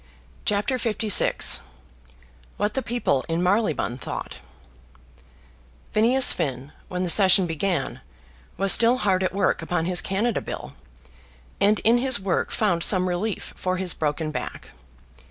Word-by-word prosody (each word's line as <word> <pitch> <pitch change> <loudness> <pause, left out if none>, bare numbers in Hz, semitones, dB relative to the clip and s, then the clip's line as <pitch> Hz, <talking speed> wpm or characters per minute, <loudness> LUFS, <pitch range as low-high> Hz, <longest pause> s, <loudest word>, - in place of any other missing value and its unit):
CHAPTER 210 +6 -1
LVI 220 -3 +2 1.0
What 210 +1 -1
the 265 - -1
People 235 - -1
in 165 +2 -1
Marylebone 180 - 0
Thought - - -7 1.5
Phineas 245 +5 +5
Finn, 135 0 -4 0.2
when 180 0 -4
the - - -2
session 190 0 +6
began, 175 +2 -3 0.6
was 195 0 +2
still 235 +2 +5
hard 195 -6 0
at 185 - -1
work 200 +1 0
upon 175 -2 -2
his 180 0 +1
Canada 210 +4 -1
bill, - - -8 0.9
and 210 +2 +3
in 235 +2 +3
his 260 -2 +2
work 190 -2 -2
found 195 -6 0
some 185 0 +2
relief 185 +4 -4
for 185 0 -3
his 180 -2 -1
broken 155 0 -3
back. - - -7
195 Hz, 135 wpm, -23 LUFS, 175-220 Hz, 1.5 s, session